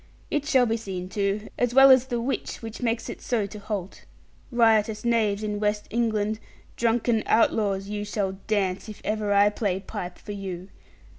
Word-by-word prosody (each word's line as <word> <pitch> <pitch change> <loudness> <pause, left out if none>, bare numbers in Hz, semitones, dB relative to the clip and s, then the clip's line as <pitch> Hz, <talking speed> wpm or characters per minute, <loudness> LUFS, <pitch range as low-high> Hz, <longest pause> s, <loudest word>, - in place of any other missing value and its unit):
It 295 -1 -1
shall 260 -5 +4
be 225 0 0
seen 185 -4 -6
to, 200 +1 -1
as 245 0 +1
well 270 0 +9
as 260 0 +5
the 240 -2 -1
witch 240 0 -3
which 225 +1 -7
makes 230 -1 -1
it - - -7
so 230 -4 0
to 210 +1 -8
halt. 200 -3 -5 0.5
Riotous 220 -2 +3
knaves 220 -3 +1
in 210 -1 -2
West 210 0 0
England, 220 -2 0 0.4
drunken 235 -1 +1
outlaws, 200 -3 +2
you 205 0 -3
shall 200 -2 -2
dance, 195 -2 0
if 210 - -9
ever 215 -1 -1
I 200 +1 +5
play 200 -3 -1
pipe 185 -3 -6
for - - -9
you. 190 -2 -6
215 Hz, 175 wpm, -26 LUFS, 200-230 Hz, 0.5 s, well